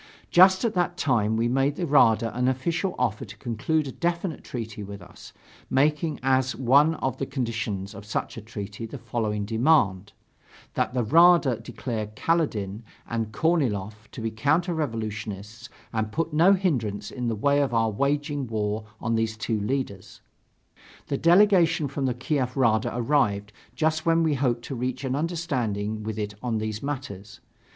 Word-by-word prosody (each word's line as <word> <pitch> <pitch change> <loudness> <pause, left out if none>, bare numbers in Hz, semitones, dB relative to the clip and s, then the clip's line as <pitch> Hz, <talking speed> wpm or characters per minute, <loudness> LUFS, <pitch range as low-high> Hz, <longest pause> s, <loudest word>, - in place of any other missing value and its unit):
Just 185 +4 +6
at 225 - 0
that 175 -1 0
time, 110 -8 +1
we 115 +1 +1
made 135 +3 +1
the 175 - -2
Rada 115 -6 +4
an 125 +1 +1
official 165 +8 -1
offer 115 -4 -1
to 105 - -11
conclude 130 +7 -1
a - - -4
definite 170 +1 -2
treaty 115 -3 -6
with 100 0 -7
us, 90 - -13 0.4
making 150 +3 +1
as 130 0 +2
one 140 +5 +4
of 130 -3 -2
the 135 - -2
conditions 110 -6 -3
of 100 - -9
such 105 - -3
a 115 - -7
treaty 105 0 -7
the 140 - -8
following 110 -3 -2
demand: 105 - +2 0.6
that - - -1
the 125 - +1
Rada 165 -1 +5
declare 115 -1 -4
Kaledin 110 - 0 0.3
and 115 -2 -2
Korniloff 110 - -1
to - - -7
be 115 0 -2
counter 155 +10 +1
revolutionists 110 - -5 0.2
and 110 -1 -1
put 165 +4 -2
no 170 +6 +6
hindrance 130 - -1
in 125 -2 -3
the 115 - 0
way 140 +6 +2
of 140 - 0
our 115 -1 +2
waging 145 +3 -1
war 110 -1 -2
on 115 - -1
these 110 -1 0
two 110 -1 -1
leaders. 105 -4 -4 0.9
The 140 - 0
delegation 175 -3 +4
from 135 0 -2
the 125 - -1
Kiev 130 0 -2
Rada 110 -4 +3
arrived, 115 -5 0 0.2
just 155 +3 +1
when 165 0 +4
we 160 -2 +2
hoped 125 -4 0
to - - -5
reach 125 +1 -3
an 130 -1 -1
understanding 125 - -2
with 110 0 -5
it 105 -1 -3
on 120 -3 -1
these 110 0 -3
matters. 125 -7 -6
125 Hz, 165 wpm, -25 LUFS, 110-150 Hz, 0.9 s, Just